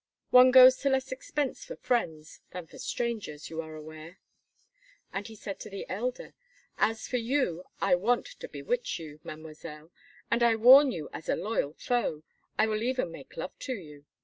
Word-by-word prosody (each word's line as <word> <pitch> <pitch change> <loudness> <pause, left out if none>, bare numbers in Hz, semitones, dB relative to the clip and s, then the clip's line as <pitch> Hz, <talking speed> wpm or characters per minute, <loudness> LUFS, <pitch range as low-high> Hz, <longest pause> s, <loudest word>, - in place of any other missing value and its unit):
One 250 0 +8
goes 255 0 +9
to 280 - 0
less 265 0 0
expense 275 +1 -3
for - - -8
friends 160 -11 -2
than 180 -2 -6
for - - -15
strangers, 215 -12 -4
you 165 0 -3
are 160 -1 -10
aware." 155 +3 -10 1.0
And 200 +1 -4
he 225 - -11
said 200 -2 -7
to - - -8
the 195 -1 -7
elder: 245 +6 -4 0.5
"As 225 0 +1
for 250 - -1
you, 230 - -1
I 195 -2 +2
want 215 +8 +2
to - - -7
bewitch - - -2
you, 155 -3 -10
Mademoiselle, 155 0 -10 0.4
and 235 - +2
I 235 -1 +5
warn 260 +5 +8
you 155 -5 -5
as 160 - -8
a - - +3
loyal 205 -9 -2
foe! 200 -11 -1 0.3
I 215 - +4
will 215 -1 -1
even 250 -6 -1
make 145 -5 -12
love 165 - -5
to 260 - -3
you. 150 -7 -12
215 Hz, 180 wpm, -29 LUFS, 160-250 Hz, 1.0 s, goes